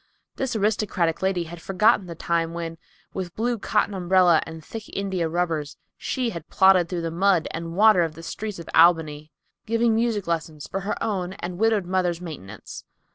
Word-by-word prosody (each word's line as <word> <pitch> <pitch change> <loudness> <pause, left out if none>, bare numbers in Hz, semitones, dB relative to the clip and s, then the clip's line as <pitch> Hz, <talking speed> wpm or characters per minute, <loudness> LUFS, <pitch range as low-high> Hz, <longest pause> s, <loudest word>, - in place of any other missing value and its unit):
This 265 -3 -2
aristocratic 205 -5 0
lady 190 -2 +1
had 170 0 -10
forgotten 200 +1 +2
the 170 - -7
time 165 0 -1
when, 165 -1 -5 0.3
with 180 -2 -5
blue 235 +1 -1
cotton 200 - 0
umbrella 180 -2 +4
and 160 -1 -9
thick 225 -1 -8
India 190 -4 -2
rubbers, 160 -4 -2 0.2
she 250 -3 -2
had 170 -3 -8
plodded 190 -3 +5
through 175 -2 -3
the 165 - -2
mud 180 -1 +2
and 165 +1 -5
water 215 -2 +6
of 165 -2 -1
the 165 - -10
streets 210 +4 -5
in 170 - -8
Albany, 155 -3 +4 0.4
giving 230 +1 +2
music 225 -3 0
lessons 160 -3 -3
for 195 - -4
her 195 +2 -2
own 190 -5 -2
and 175 -1 -6
widowed 220 -3 +2
mother's 180 -2 0
maintenance. 155 - -9
180 Hz, 180 wpm, -24 LUFS, 165-205 Hz, 0.4 s, water